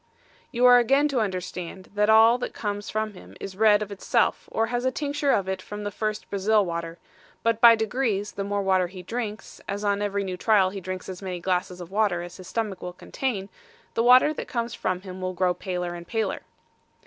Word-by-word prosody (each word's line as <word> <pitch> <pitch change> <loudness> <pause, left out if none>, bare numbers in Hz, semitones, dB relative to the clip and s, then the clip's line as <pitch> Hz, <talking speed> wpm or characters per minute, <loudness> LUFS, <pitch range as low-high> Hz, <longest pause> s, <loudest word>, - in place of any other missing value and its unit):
You 245 +1 +2
are 245 0 +9
again 275 +5 +3
to 270 -4 0
understand 185 -2 -4
that 210 +1 +2
all 225 +2 +6
that - - -5
comes 205 0 -4
from 215 0 -2
him 95 - -14
is 190 - -7
red 210 0 +4
of 210 - -9
itself, 200 - 0
or 225 - +1
has 245 +1 -2
a 260 - +3
tincture 290 0 -2
of 195 -2 +1
it 190 -1 -2
from 210 +2 -7
the 205 - -3
first 215 +1 -3
Brazil 205 +1 +2
water; 170 -1 -4 0.5
but 230 -1 +1
by 235 -1 +9
degrees, 220 -2 -1
the 200 - -4
more 200 0 -1
water 190 -2 +2
he 185 0 -10
drinks, 220 +1 -5
as 200 +1 -3
on 205 0 +1
every 200 -1 -1
new 185 -2 -4
trial 195 -2 +3
he 195 0 -6
drinks 185 +1 -6
as 185 0 -7
many 185 -2 -4
glasses 180 0 -1
of 175 0 -9
water 200 -4 +1
as 175 - -9
his 185 -2 -11
stomach 210 -1 -3
will 180 0 -6
contain, 200 +1 -3 0.5
the - - +1
water 255 +5 +6
that - - -6
comes 235 -1 -3
from 185 0 -2
him 185 -1 -9
will 185 0 -2
grow 180 0 +1
paler 180 -2 -4
and 170 0 -9
paler. 225 0 -2
205 Hz, 220 wpm, -25 LUFS, 185-225 Hz, 0.5 s, are